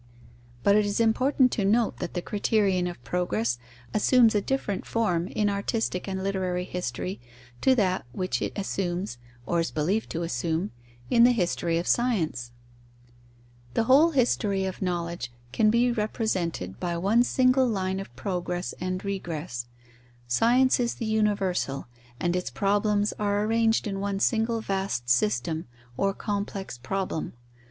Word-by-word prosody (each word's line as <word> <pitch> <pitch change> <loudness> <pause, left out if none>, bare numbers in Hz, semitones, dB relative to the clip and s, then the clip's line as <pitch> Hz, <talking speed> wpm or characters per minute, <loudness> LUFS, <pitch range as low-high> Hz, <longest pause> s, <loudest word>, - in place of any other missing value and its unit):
But 200 - +5
it 210 - +5
is 205 +1 -1
important 255 +3 +3
to 205 - -1
note 220 +3 +2
that 175 - -5
the 175 - -2
criterion 200 -3 +1
of 175 - -7
progress 120 -10 -1 0.3
assumes 230 +1 +5
a 205 - +2
different 205 -6 -2
form 180 -7 0
in 210 +1 0
artistic 200 -1 -1
and 190 -1 -3
literary 185 -2 -1
history 180 -2 -4 0.4
to 265 - +5
that 185 - +1
which 185 +8 -2
it - - -1
assumes 185 -6 -2 0.3
(or 170 - +1
is 165 - 0
believed 180 +9 -1
to 170 - -3
assume) 165 +5 -1 0.4
in 235 - +6
the 245 - +7
history 175 -5 0
of 170 - -1
science. 165 - 0 1.2
The - - +3
whole 275 +8 +6
history 220 -8 +1
of 190 - -5
knowledge 170 -7 -2 0.2
can 215 -1 +3
be 240 +2 +3
represented 190 - -2
by 175 -1 -2
one 200 +7 +3
single 255 +1 +3
line 190 -4 -1
of 195 - -7
progress 180 +1 -3
and 185 +1 -3
regress. 165 -11 -4 0.6
Science 245 - +4
is 240 -1 0
the 230 - -4
universal, 200 -10 0 0.3
and 175 0 0
its 180 - -1
problems 205 +1 +1
are 205 0 +1
arranged 225 +1 +2
in 195 -2 -3
one 200 0 -2
single 225 +2 +1
vast 190 - -1
system, 120 +7 +1 0.3
or 195 +6 +1
complex 200 - -4
problem. 185 +5 -3
195 Hz, 145 wpm, -27 LUFS, 175-220 Hz, 1.2 s, the